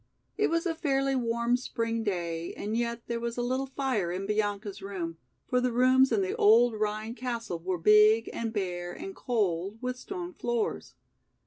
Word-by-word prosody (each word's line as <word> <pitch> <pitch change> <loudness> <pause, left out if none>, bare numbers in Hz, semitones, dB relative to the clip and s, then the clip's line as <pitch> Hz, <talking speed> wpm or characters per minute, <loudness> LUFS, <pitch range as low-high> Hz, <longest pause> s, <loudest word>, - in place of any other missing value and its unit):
It 425 - +2
was 335 +1 0
a 340 - +1
fairly 275 -4 0
warm 235 -1 +1
spring 230 -2 -2
day 170 -5 -3
and 210 +2 -3
yet 235 0 -1
there 235 0 -2
was 235 0 -4
a 245 - 0
little 260 +2 -1
fire 260 -10 -1
in 185 +2 -3
Bianca's 205 -1 -2
room, 180 -4 -5 0.3
for 250 0 +1
the 250 0 +1
rooms 255 +2 +4
in 210 -4 +2
the 185 - -2
old 230 +3 +6
Rhine 215 +1 -2
castle 235 -8 -4
were 180 +2 -2
big 210 +5 +5
and 230 -1 -3
bare 175 -4 -3
and 385 0 -7
cold, 200 -5 -1
with 250 0 -3
stone 360 +1 -6
floors. 240 -6 -2
230 Hz, 180 wpm, -29 LUFS, 200-250 Hz, 0.3 s, old